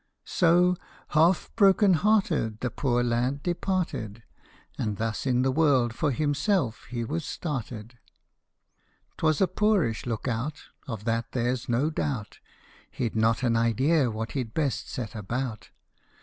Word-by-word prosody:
So, 180 +1 +3 0.3
half 165 +4 +3
broken 200 -2 +5
hearted, 165 - +1
the 125 - -1
poor 120 -3 0
lad 120 +4 0
departed, 170 - -2 0.5
And 105 -2 -2
thus 115 +4 -2
in 125 -1 +2
the 130 - +2
world 130 -5 +3
for 150 +5 0
himself 145 - 0
he 120 -1 -4
was 155 +7 -3
started. 120 -8 -5 1.2
'T - - -10
was 155 +1 +2
a 190 - +5
poorish 185 - +1
look 115 +1 -3
out, 125 +6 -2 0.3
Of 110 -4 -6
that 115 0 -1
there 125 0 +1
's 130 +1 -9
no 130 +7 +1
doubt; 135 -9 -3 0.5
He 120 - -2
'd - - -17
not 115 +3 +2
an 120 -2 +2
idea 125 +5 +2
what 110 +1 -4
he 135 - -1
'd 115 -2 -14
best 145 -5 -1
set 115 -5 -5
about. 115 +2 -4
130 Hz, 150 wpm, -27 LUFS, 115-160 Hz, 1.2 s, broken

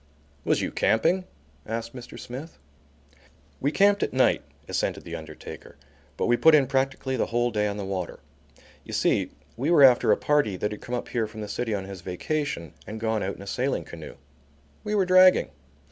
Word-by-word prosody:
"Was - - +1
you - - -2
camping?" 170 +11 +2 0.4
asked 115 +3 -5
Mr. 125 -2 -9
Smith. 135 +7 -8 1.0
"We 140 - 0
camped 200 +4 +4
at - - -1
night," 130 0 +3 0.3
assented - - -2
the - - -6
undertaker, 80 -1 -10 0.4
"but - - 0
we 120 - +4
put 160 +3 +7
in 145 -3 +5
practically 135 0 -1
the - - 0
whole 120 +1 0
day 105 -1 +1
on 100 0 -3
the 100 - -4
water. 95 -3 -4 0.6
You - - -9
see - - +1 0.3
we 135 +7 -1
were 170 -5 +6
after 125 -3 +6
a - - +4
party 145 -10 +1
that 105 +3 -2
had 105 - -7
come 125 - -4
up 120 - -5
here 115 -3 -1
from 110 0 -9
the 105 - -5
city 110 +1 -2
on 95 -1 -4
his 95 -2 -8
vacation 90 - -3
and 110 +1 -6
gone 110 -1 0
out 95 - -2
in 100 - -10
a - - -10
sailing 130 +6 -1
canoe. - - -10 0.7
We 210 - -2
were 195 -2 +3
dragging. 185 - +6
120 Hz, 195 wpm, -26 LUFS, 105-145 Hz, 1.0 s, put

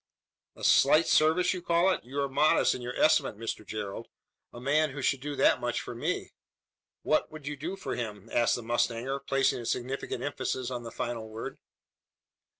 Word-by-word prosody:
"A - - -12
slight 150 +4 +5
service, 160 +5 +3
you 180 - -5
call 175 +2 +3
it? - - -2
You 135 +4 -3
are 140 - 0
modest 145 +3 +3
in - - -6
your 125 +1 -5
estimate, 140 -8 +3
Mr 115 -1 -4
Gerald. 105 -1 -5 0.4
A 120 - -10
man 150 +4 +2
who 135 +1 -6
should 135 -1 +1
do 145 +1 -4
that - - +4
much - - -1
for - - -6
me!" - - -3 0.7
"What 155 - +1
would 155 -2 -10
you 150 +1 -3
do 160 +7 -5
for 195 - -5
him?" 105 -5 -5
asked 120 -1 +3
the 120 - -6
mustanger, 120 +3 0
placing 135 -2 +1
a 120 - -7
significant 130 +2 -3
emphasis 130 -3 -3
on 120 -1 -3
the 115 - -7
final 115 -1 -4
word. 110 +1 -7
135 Hz, 190 wpm, -29 LUFS, 120-150 Hz, 0.7 s, slight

